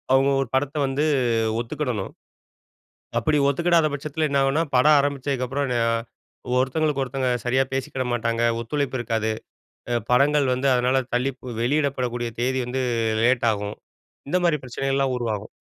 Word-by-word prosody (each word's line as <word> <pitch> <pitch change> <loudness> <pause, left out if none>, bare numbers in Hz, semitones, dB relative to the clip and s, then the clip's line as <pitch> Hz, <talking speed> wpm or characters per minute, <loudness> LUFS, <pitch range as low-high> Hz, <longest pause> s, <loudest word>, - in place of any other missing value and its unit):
அவுங்க 135 +1 +4
1 135 - -2
படத்த 140 +2 0
வந்து 135 +2 -1 0.6
ஒத்துக்கிடணும். 120 -3 -3 1.1
அப்படி 155 -1 +1
ஒத்துக்கிடாத 165 +2 +3
பட்சத்தில 150 +2 -2
என்ன 140 -1 +1
ஆகும்ன்னா, 135 +4 +2
படம் 150 +4 +6
ஆரம்பிச்சதுக்கு 140 -2 -1
அப்புறம் 140 +2 -2
அ - - +2 0.7
ஒருத்தங்களுக்கு 140 +2 +1
ஒருத்தங்க 130 0 -2 0.2
சரியா 130 +2 +2
பேசிக்கிட 135 -1 -2
மாட்டாங்க, 115 0 0 0.2
ஒத்துழைப்பு 135 +2 -2
இருக்காது. 115 -2 -1 0.6
அ - - +1 0.2
படங்கள் 140 +2 +4
வந்து 130 +2 0
அதனால 125 +2 +2
தள்ளிப் 130 +2 -1 0.2
வெளியிடப்படக்கூடிய 125 -3 0
தேதி 130 +2 0
வந்து 130 +2 -2 0.4
லேட் 125 -1 +3
ஆகும். 105 -1 -4 0.5
இந்த 180 - +2
மாரி 165 -3 +3
பிரச்சனைகள்லாம் 135 +1 -1
உருவாகும். 110 -4 -3
135 Hz, 135 wpm, -23 LUFS, 125-140 Hz, 1.1 s, படம்